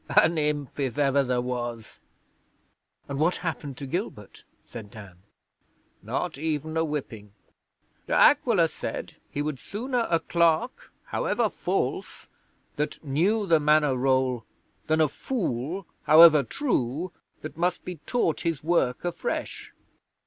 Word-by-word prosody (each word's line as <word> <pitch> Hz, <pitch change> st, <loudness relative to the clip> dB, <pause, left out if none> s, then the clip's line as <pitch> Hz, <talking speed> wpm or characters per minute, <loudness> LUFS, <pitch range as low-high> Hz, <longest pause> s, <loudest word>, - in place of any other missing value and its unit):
An 165 Hz, +1 st, +3 dB
imp, 150 Hz, -2 st, -2 dB
if 130 Hz, -3 st, -2 dB
ever 140 Hz, -1 st, +3 dB
there 125 Hz, -2 st, 0 dB
was!' 120 Hz, -2 st, -5 dB, 1.1 s
'And 140 Hz, 0 st, -4 dB
what 170 Hz, +4 st, +2 dB
happened 145 Hz, -5 st, -4 dB
to 140 Hz, -, -6 dB
Gilbert?' 135 Hz, -, -5 dB, 0.2 s
said 110 Hz, -3 st, -9 dB
Dan. 100 Hz, -4 st, -12 dB, 0.8 s
'Not -, -, -3 dB
even 155 Hz, 0 st, -2 dB
a 160 Hz, -, +2 dB
whipping. 120 Hz, -10 st, -5 dB, 0.7 s
De -, -, -2 dB
Aquila -, -, +5 dB
said -, -, -6 dB
he 145 Hz, -, -3 dB
would 150 Hz, -3 st, -3 dB
sooner 240 Hz, -, -2 dB
a 165 Hz, -, +3 dB
clerk, 170 Hz, -2 st, 0 dB
however -, -, 0 dB
false, -, -, -3 dB, 0.5 s
that 150 Hz, +2 st, -3 dB
knew 185 Hz, +10 st, +1 dB
the 165 Hz, -4 st, +4 dB
Manor 150 Hz, -2 st, +3 dB
roll 130 Hz, -2 st, +1 dB, 0.4 s
than 155 Hz, 0 st, +2 dB
a 155 Hz, -, +5 dB
fool, 175 Hz, -, -3 dB, 0.2 s
however 155 Hz, -1 st, +8 dB
true, 155 Hz, -, -2 dB, 0.3 s
that 155 Hz, -, -7 dB
must 175 Hz, +2 st, -1 dB
be 180 Hz, -2 st, -6 dB
taught 235 Hz, -10 st, 0 dB
his 165 Hz, -5 st, -2 dB
work 160 Hz, -5 st, +1 dB
afresh. 175 Hz, -, -4 dB
150 Hz, 130 wpm, -26 LUFS, 130-170 Hz, 1.1 s, however